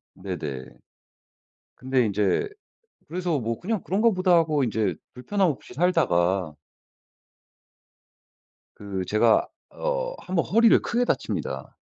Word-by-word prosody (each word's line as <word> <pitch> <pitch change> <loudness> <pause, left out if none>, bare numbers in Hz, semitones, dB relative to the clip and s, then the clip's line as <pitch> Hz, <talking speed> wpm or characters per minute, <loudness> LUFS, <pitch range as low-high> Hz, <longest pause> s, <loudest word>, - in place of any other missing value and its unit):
네네. 75 -9 -5 1.1
근데 130 -1 +1
인제 105 - 0 0.6
그래서 175 -1 -1
뭐 115 -2 -3
'그냥 210 0 -2
그런가 215 +5 +2
보다.' 185 -2 +2
하고 155 -4 +2
인제 110 -5 0 0.2
불편함 190 +9 0
없이 140 -4 -5
살다가 95 - +1 2.2
그 100 -2 -5
제가 110 +1 +3 0.2
어 - - -2
한번 180 -2 -1
허리를 230 +3 +5
크게 240 +1 0
다칩니다. - - -3
145 Hz, 220 characters per minute, -25 LUFS, -, 2.2 s, 허리를